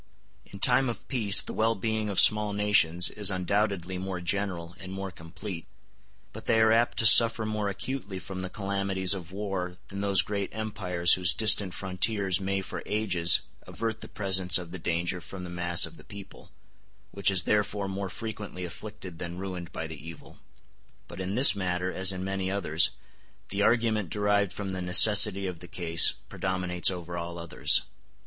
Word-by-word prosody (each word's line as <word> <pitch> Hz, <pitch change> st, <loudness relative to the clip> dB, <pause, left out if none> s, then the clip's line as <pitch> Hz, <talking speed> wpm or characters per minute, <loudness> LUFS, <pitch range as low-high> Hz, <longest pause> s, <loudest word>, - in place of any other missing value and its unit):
In 100 Hz, -, -11 dB
time 130 Hz, +5 st, +2 dB
of 115 Hz, -, -8 dB
peace 110 Hz, -7 st, +5 dB
the -, -, -7 dB
well 115 Hz, +1 st, +1 dB
being 110 Hz, +1 st, -2 dB
of 100 Hz, -, 0 dB
small 105 Hz, -1 st, +4 dB
nations 100 Hz, -4 st, +2 dB
is 105 Hz, -2 st, +1 dB
undoubtedly 95 Hz, -1 st, -1 dB
more 95 Hz, -1 st, -5 dB
general 90 Hz, -2 st, -3 dB
and 95 Hz, -1 st, -9 dB
more 95 Hz, 0 st, -6 dB
complete, 85 Hz, +1 st, -9 dB, 0.7 s
but -, -, -11 dB
they 110 Hz, -, +3 dB
are 110 Hz, 0 st, +4 dB
apt 115 Hz, +2 st, +2 dB
to 110 Hz, -, +1 dB
suffer 115 Hz, 0 st, +7 dB
more 105 Hz, -1 st, -2 dB
acutely 100 Hz, -1 st, -5 dB
from 95 Hz, 0 st, -7 dB
the 95 Hz, -, -5 dB
calamities 100 Hz, -1 st, -1 dB
of 90 Hz, -3 st, -7 dB
war 95 Hz, -3 st, -4 dB
than 100 Hz, +1 st, -6 dB
those 100 Hz, -2 st, +3 dB
great 100 Hz, -1 st, -4 dB
empires 90 Hz, -5 st, 0 dB
whose 90 Hz, -2 st, +2 dB
distant 105 Hz, -4 st, +4 dB
frontiers 95 Hz, 0 st, 0 dB
may 95 Hz, 0 st, -2 dB
for -, -, -7 dB
ages 95 Hz, -6 st, +2 dB, 0.3 s
avert 115 Hz, -1 st, -4 dB
the -, -, -7 dB
presence 95 Hz, -3 st, +1 dB
of 90 Hz, -2 st, -8 dB
the 95 Hz, -, -7 dB
danger 85 Hz, +2 st, -2 dB
from 95 Hz, +2 st, -9 dB
the 90 Hz, -, -8 dB
mass 85 Hz, 0 st, 0 dB
of -, -, -13 dB
the -, -, -15 dB
people, 100 Hz, -1 st, -13 dB, 0.6 s
which 100 Hz, -1 st, +1 dB
is 95 Hz, -3 st, +1 dB
therefore 105 Hz, 0 st, -1 dB
more 95 Hz, 0 st, -4 dB
frequently 105 Hz, -3 st, -7 dB
afflicted 95 Hz, -1 st, -10 dB
than 85 Hz, -1 st, -6 dB
ruined 90 Hz, -2 st, -7 dB
by 80 Hz, -, -5 dB
the 80 Hz, -3 st, -9 dB
evil. 85 Hz, -1 st, -12 dB, 0.7 s
But 85 Hz, +2 st, -8 dB
in 95 Hz, +2 st, -4 dB
this 130 Hz, -3 st, +8 dB
matter, 90 Hz, -1 st, -2 dB
as 95 Hz, 0 st, +2 dB
in 95 Hz, 0 st, -5 dB
many 95 Hz, 0 st, -3 dB
others, 85 Hz, -5 st, 0 dB, 0.6 s
the 100 Hz, +1 st, -3 dB
argument 110 Hz, -4 st, +1 dB
derived 105 Hz, -1 st, 0 dB
from 95 Hz, +1 st, -5 dB
the 95 Hz, -, -4 dB
necessity 100 Hz, +2 st, +6 dB
of 90 Hz, -3 st, -5 dB
the 90 Hz, -, -12 dB
case 85 Hz, -2 st, +3 dB
predominates 90 Hz, -2 st, 0 dB
over 85 Hz, -2 st, -6 dB
all 85 Hz, 0 st, -7 dB
others. 85 Hz, -1 st, +1 dB
95 Hz, 180 wpm, -27 LUFS, 90-105 Hz, 0.7 s, this